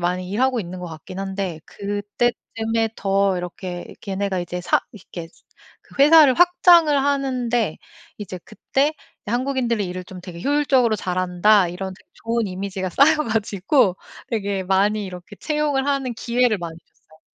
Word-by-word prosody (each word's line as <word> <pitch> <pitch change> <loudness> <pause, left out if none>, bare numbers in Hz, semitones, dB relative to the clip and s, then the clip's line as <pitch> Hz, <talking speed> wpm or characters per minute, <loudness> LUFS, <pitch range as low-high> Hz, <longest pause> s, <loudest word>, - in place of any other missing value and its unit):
많이 180 +1 -1
일하고 255 +3 +1
있는 180 0 -7
것 180 - -5
같긴 165 +3 -9
한데 195 -4 -4
그때쯤에 220 +2 -2
더 195 -1 +1
이렇게 180 0 -6
걔네가 195 -1 -2
이제 175 +1 -5
사 175 - +2
이렇게 175 -5 -9 0.5
그 - - -8
회사를 300 -3 +7
확장을 345 -3 +5
하는데 250 - 0 0.4
이제 190 -3 -6
그때 275 +7 -1 0.3
'한국인들이 240 -2 0
일을 180 +1 -6
좀 185 0 -10
되게 175 -2 -9
효율적으로 270 -5 +2
잘한다.' 185 +1 +2
이런 190 +2 -5
되게 - - -23 0.2
좋은 230 -1 0
이미지가 190 0 -4
쌓여 285 - +5
가지고 215 -1 +1 0.3
되게 200 -4 -2
많이 200 +3 +1
이렇게 180 +2 -10
채용을 300 -3 -1
하는 270 -3 -1
기회를 235 -2 +1
많이 165 -2 -6
줬어요. 160 -2 -27
205 Hz, 330 characters per minute, -22 LUFS, 185-250 Hz, 0.5 s, 회사를